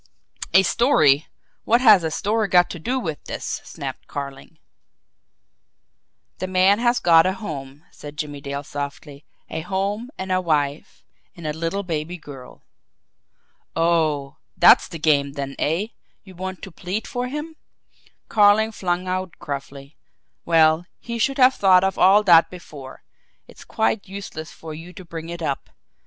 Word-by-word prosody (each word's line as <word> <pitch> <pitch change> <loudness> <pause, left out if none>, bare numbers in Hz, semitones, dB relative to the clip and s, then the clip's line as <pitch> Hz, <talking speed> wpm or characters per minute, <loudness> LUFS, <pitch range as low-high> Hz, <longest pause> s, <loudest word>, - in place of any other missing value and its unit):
"A 190 - +8
story! 160 - +3 0.4
What 235 +2 +3
has 215 -8 +6
a 160 - 0
story 210 +6 0
got 180 -1 +4
to 175 - -7
do 250 +10 -1
with 160 - -5
this?" - - -5
snapped - - -8
Carling. 140 +2 -7 1.8
"The 185 - -3
man 185 +3 +3
has 240 0 +2
got 165 -2 +5
a 190 - 0
home," 145 -8 -8
said 145 0 -11
Jimmie 145 -1 -5
Dale 140 0 -5
softly. 145 0 -7 0.2
"A 160 - -5
home, 200 +6 -3
and 190 0 -5
a 185 0 +2
wife 150 -3 -2 0.3
and 170 - -11
a 150 - -2
little 165 +5 -3
baby 165 0 -4
girl." 135 -5 -12 1.1
"Oh, 160 -4 +1 0.2
that's - - +7
the 165 - -8
game 145 -3 +2
then, 140 -1 -5
eh? 170 +9 0 0.3
You 190 - -14
want 185 +1 -6
to 195 - -8
plead 185 +6 -4
for 245 0 -3
him?" 300 +4 -6 0.7
Carling 215 +1 +4
flung 180 -3 -2
out 185 -1 -3
gruffly. 140 0 -7 0.5
"Well, 160 +1 +4
he 235 0 -6
should 270 +5 +1
have 260 0 +6
thought 185 -4 +4
of 190 0 -1
all 200 +3 +6
that 170 -4 +6
before! 145 -7 -11 0.4
It's - - -14
quite 220 -2 -1
useless 190 -5 -8
for 160 -1 -9
you 165 +4 -10
to 185 -2 -11
bring 165 -1 -7
it 170 -1 -6
up. 140 -3 -3
170 Hz, 155 wpm, -22 LUFS, 150-195 Hz, 1.8 s, A